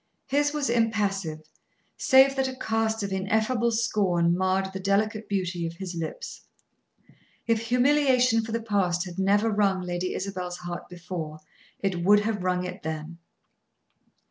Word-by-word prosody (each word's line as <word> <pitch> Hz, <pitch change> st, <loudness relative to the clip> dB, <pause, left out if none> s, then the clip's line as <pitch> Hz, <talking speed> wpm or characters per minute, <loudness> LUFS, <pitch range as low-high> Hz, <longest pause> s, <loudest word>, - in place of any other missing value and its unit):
His 290 Hz, +2 st, +1 dB
was 295 Hz, -2 st, -1 dB
impassive, 200 Hz, -8 st, 0 dB, 0.5 s
save 265 Hz, +1 st, +5 dB
that 265 Hz, -1 st, +1 dB
a 260 Hz, -, -5 dB
cast 220 Hz, -2 st, -1 dB
of 195 Hz, -1 st, -3 dB
ineffable 220 Hz, +5 st, +1 dB
scorn 185 Hz, -7 st, +1 dB
marred 190 Hz, +1 st, 0 dB
the 190 Hz, -, -4 dB
delicate 210 Hz, +3 st, 0 dB
beauty 180 Hz, -4 st, -1 dB
of 165 Hz, -, -7 dB
his 185 Hz, 0 st, -6 dB
lips. 170 Hz, -, -6 dB, 1.0 s
If 230 Hz, -1 st, 0 dB
humiliation 250 Hz, -2 st, +3 dB
for 225 Hz, -, -6 dB
the 230 Hz, 0 st, -2 dB
past 190 Hz, -5 st, 0 dB
had 180 Hz, 0 st, -7 dB
never 205 Hz, +3 st, +3 dB
wrung 200 Hz, -3 st, +1 dB
Lady 180 Hz, 0 st, -3 dB
Isabel's 185 Hz, -2 st, -4 dB
heart 175 Hz, -1 st, -7 dB
before, 170 Hz, -3 st, -6 dB, 0.4 s
it 185 Hz, -3 st, -1 dB
would 205 Hz, +3 st, +6 dB
have 210 Hz, -2 st, -2 dB
wrung 180 Hz, 0 st, 0 dB
it 180 Hz, -, -7 dB
then. 160 Hz, +1 st, -5 dB
200 Hz, 145 wpm, -26 LUFS, 180-225 Hz, 1.0 s, would